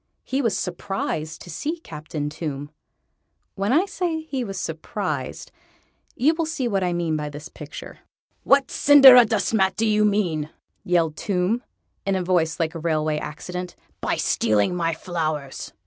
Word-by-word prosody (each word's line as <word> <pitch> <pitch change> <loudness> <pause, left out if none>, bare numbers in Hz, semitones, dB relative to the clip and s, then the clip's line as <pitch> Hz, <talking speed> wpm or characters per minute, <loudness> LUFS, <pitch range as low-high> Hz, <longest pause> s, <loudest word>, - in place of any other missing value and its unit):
He 270 +2 -1
was 230 -6 +1
surprised 175 -3 -3
to 175 - -9
see 305 - -3
Captain 155 - -6
Tomb. 150 -1 -5 0.8
When 200 +3 -1
I 325 +8 +4
say 345 -5 -2
he 275 -5 -3
was 195 -4 -5
surprised, - - -4 0.6
you 295 +6 +3
will 325 -1 -2
see 275 -6 -2
what 195 -4 0
I 180 - +1
mean 170 -2 -1
by 150 -1 -3
the 145 +2 -9
picture. 150 -1 -9 0.4
"What 275 -1 +4
cinderadustmat 235 -8 +6
do 225 - 0
you 215 -1 +3
mean," 180 -8 +1 0.3
yelled 165 -3 +1
Tomb, 200 +4 0 0.4
in 195 -1 0
a 185 - 0
voice 175 -3 +1
like 165 0 0
a 165 - -6
railway 155 -2 0
accident, 180 +4 -6 0.3
"by - - 0
stealing 105 - +1
my 165 -2 0
flowers?" 155 -5 -4
180 Hz, 150 wpm, -23 LUFS, 155-225 Hz, 0.8 s, cinderadustmat